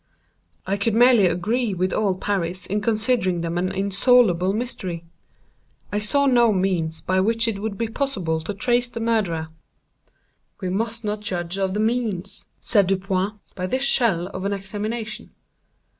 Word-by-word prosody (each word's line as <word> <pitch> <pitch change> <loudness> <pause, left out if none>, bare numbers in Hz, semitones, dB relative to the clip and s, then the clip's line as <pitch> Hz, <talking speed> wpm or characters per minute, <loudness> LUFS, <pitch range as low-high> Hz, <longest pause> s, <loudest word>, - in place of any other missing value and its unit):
I 195 +1 -1
could 210 +2 0
merely 240 -4 +6
agree 205 +5 0
with 185 +1 -1
all 195 -4 +1
Paris 185 -2 -2
in 205 +2 -1
considering 215 -5 +1
them 165 0 -3
an 185 +1 -1
insoluble 195 -2 +3
mystery. 195 -7 -4 0.9
I 205 - 0
saw 280 +7 +2
no 240 -4 +4
means 180 -5 0
by 185 0 0
which 225 +4 +2
it 205 -3 -2
would 215 -2 -3
be 230 - -1
possible 205 - -2
to 160 +6 -4
trace 240 +4 +1
the 230 - -6
murderer. 200 -9 0 1.1
"We 185 - -3
must 225 +4 -2
not 210 0 -2
judge 180 -2 -3
of 190 0 -1
the - - -1
means," 215 -4 -1
said 205 -5 +3
Dupin, 195 +1 0 0.2
"by 185 0 -3
this 260 +7 -1
shell 230 -10 +3
of 185 -1 -6
an 200 +1 -1
examination. 215 +3 -5
200 Hz, 160 wpm, -23 LUFS, 185-230 Hz, 1.1 s, merely